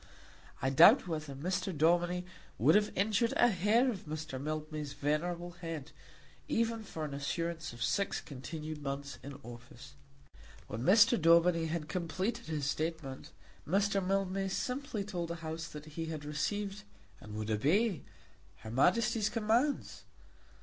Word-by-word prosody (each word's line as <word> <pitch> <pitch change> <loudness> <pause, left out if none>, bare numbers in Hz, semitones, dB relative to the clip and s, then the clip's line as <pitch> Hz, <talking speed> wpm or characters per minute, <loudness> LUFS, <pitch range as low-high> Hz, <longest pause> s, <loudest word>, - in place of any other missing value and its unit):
I 135 - +2
doubt 170 - +7
whether 155 -4 -4
Mr. 180 +6 -2
Daubeny 175 +3 +2 0.3
would - - +5
have 210 0 +3
injured 215 +4 +2
a 245 - +6
hair 210 +6 +3
of 195 -5 -7
Mr. 155 -3 -5
Mildmay's 155 -1 -4
venerable 170 +5 -1
head, 165 -5 -6 0.6
even 230 0 0
for 160 -6 -5
an 145 - -6
assurance 160 +3 -3
of 120 -1 -5
six 200 - 0
continued 155 +2 -7
months 140 -2 -5
in 140 +1 -8
office. 120 +3 -11 0.7
When 110 +2 -5
Mr. 210 - +6
Daubeny 170 0 +5
had 160 -1 -3
completed 185 +7 -2
his 155 -3 -2
statement, 155 -2 -3 0.4
Mr. 195 +3 +2
Mildmay 195 0 0
simply 250 +2 -2
told 180 -4 -4
the 170 - -3
House 160 +1 -4
that 150 -2 -9
he 160 +2 -5
had 155 -2 -5
received 195 +7 -2 0.4
and 105 0 -9
would 110 0 -3
obey 170 - +2 0.6
her 110 +1 -7
Majesty's 215 - +3
commands. 230 +7 0
165 Hz, 140 wpm, -33 LUFS, 150-200 Hz, 0.7 s, doubt